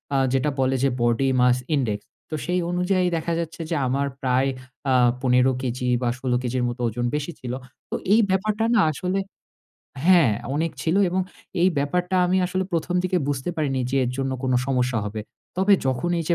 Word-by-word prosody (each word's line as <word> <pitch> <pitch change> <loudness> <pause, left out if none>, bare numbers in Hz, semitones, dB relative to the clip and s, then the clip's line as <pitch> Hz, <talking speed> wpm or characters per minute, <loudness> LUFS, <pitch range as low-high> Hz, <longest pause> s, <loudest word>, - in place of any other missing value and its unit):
আ - - +4 0.2
যেটা 135 +3 +2
বলে 130 0 +2
যে 135 - +4
Body 120 +3 +2
Mass 125 0 +4 0.2
Index, 110 -7 0 0.3
তো 155 - -3
সেই 180 +1 0
অনুযায়ী 180 +1 +1
দেখা 170 +1 -2
যাচ্ছে 165 0 -5
যে 170 - 0
আমার 140 +2 0
প্রায় 130 +1 +2 0.4
আ - - +4 0.3
১৫ 125 0 +4
কেজি 125 0 -2
বা 120 - +1
১৬ 130 -1 -2
কেজির 125 0 -1
মত 120 +1 -4
ওজন 120 +2 -2
বেশি 150 +3 -2
ছিল। 125 -1 -5 0.4
তো - - -2 0.2
এই 225 - +6
ব্যাপারটা 210 +3 +1
না 220 - +5
আসলে 185 +5 -2 0.9
হ্যাঁ 170 -11 +6 0.2
অনেক 160 +2 0
ছিল 165 +3 +1
এবং 185 +2 0 0.4
এই 185 - +6
ব্যাপারটা 180 +6 0
আমি 180 +1 +2
আসলে 185 +1 -1
১ম 170 +1 -1
দিকে 185 0 +1
বুঝতে 140 +3 -1
পারিনি 135 -4 0
যে 135 - 0
এর 125 - -1
জন্য 135 0 -1
কোনো 130 -1 +2
সমস্যা 125 -3 +1
হবে। 105 +1 -4 0.4
তবে 190 +2 +3
যখন 130 +6 0
এই 165 - -2
যে 170 - +4
140 Hz, 190 wpm, -24 LUFS, 125-180 Hz, 0.9 s, এই